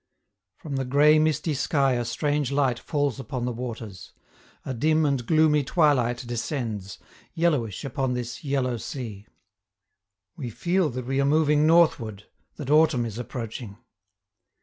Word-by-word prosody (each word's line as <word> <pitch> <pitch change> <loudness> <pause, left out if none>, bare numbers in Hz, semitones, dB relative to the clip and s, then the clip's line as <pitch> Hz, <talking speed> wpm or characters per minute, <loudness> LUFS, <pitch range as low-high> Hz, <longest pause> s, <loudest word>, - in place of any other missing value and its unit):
From 145 -4 -5
the 135 - -1
gray 145 +4 +5
misty 155 0 +1
sky 135 0 +1
a 120 -1 0
strange 145 +1 -1
light 135 -4 +1
falls 145 -3 -1
upon 130 -2 -4
the 125 - -1
waters; 115 -6 -7 0.5
a 135 - -3
dim 155 +5 +2
and 140 -4 0
gloomy 155 +2 +3
twilight 130 -6 +2
descends, 115 -5 -4 0.4
yellowish 145 - 0
upon 130 -1 -1
this 125 +2 -5
Yellow 135 -4 0
Sea. 110 -4 -7 1.1
We 125 -5 -5
feel 175 - 0
that 125 0 -5
we 135 +2 0
are - - +2
moving 150 +1 +3
northward, 125 - +3 0.3
that 145 -2 -5
autumn 150 -5 +4
is 115 0 -6
approaching. 115 -3 -6
135 Hz, 140 wpm, -25 LUFS, 120-150 Hz, 1.1 s, gray